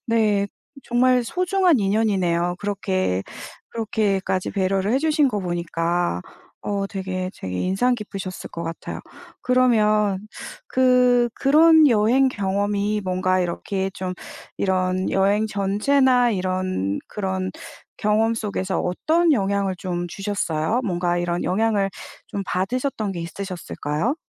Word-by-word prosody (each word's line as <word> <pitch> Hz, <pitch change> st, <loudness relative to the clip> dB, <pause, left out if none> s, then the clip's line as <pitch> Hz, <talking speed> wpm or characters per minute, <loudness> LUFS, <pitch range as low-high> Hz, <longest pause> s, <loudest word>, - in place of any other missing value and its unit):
네 215 Hz, -3 st, +2 dB, 0.4 s
정말 250 Hz, +1 st, +3 dB
소중한 365 Hz, 0 st, +2 dB
인연이네요. 190 Hz, -4 st, +1 dB
그렇게, 190 Hz, -, -1 dB, 0.5 s
그렇게까지 205 Hz, -4 st, -1 dB
배려를 195 Hz, +1 st, 0 dB
해 260 Hz, -, +3 dB
주신 305 Hz, -1 st, +2 dB
거 210 Hz, -5 st, -2 dB
보니까 175 Hz, -, -1 dB, 0.4 s
어 200 Hz, -1 st, -2 dB
되게, 185 Hz, -2 st, -4 dB
되게 90 Hz, -1 st, -4 dB
인상 195 Hz, +7 st, +1 dB
깊으셨을 195 Hz, -4 st, -7 dB
것 170 Hz, -, -6 dB
같아요. 165 Hz, 0 st, -6 dB, 0.4 s
그러면 215 Hz, -6 st, +3 dB, 0.5 s
그, 250 Hz, -, +4 dB
그런 315 Hz, +3 st, +6 dB
여행 240 Hz, +4 st, +4 dB
경험이 205 Hz, -1 st, -1 dB
뭔가 185 Hz, 0 st, +1 dB
이렇게 190 Hz, +2 st, -2 dB
좀 185 Hz, -1 st, -4 dB, 0.4 s
이런 185 Hz, -1 st, 0 dB
여행 200 Hz, +3 st, +2 dB
전체나 245 Hz, +5 st, +2 dB
이런 185 Hz, -, -1 dB
그런 190 Hz, -2 st, -3 dB, 0.5 s
경험 220 Hz, +2 st, +2 dB
속에서 200 Hz, -4 st, -2 dB
어떤 320 Hz, -, +1 dB
영향을 200 Hz, -5 st, 0 dB
좀 175 Hz, -1 st, -3 dB
주셨어요? 195 Hz, +1 st, -1 dB
뭔가 175 Hz, -3 st, 0 dB
이런 175 Hz, 0 st, -1 dB
영향을 205 Hz, 0 st, +1 dB, 0.4 s
좀 200 Hz, -, -4 dB
받으셨던 215 Hz, +2 st, -1 dB
게 175 Hz, -, -5 dB
있으셨을까요? 175 Hz, -, -3 dB
200 Hz, 260 characters per minute, -22 LUFS, 185-230 Hz, 0.5 s, 그런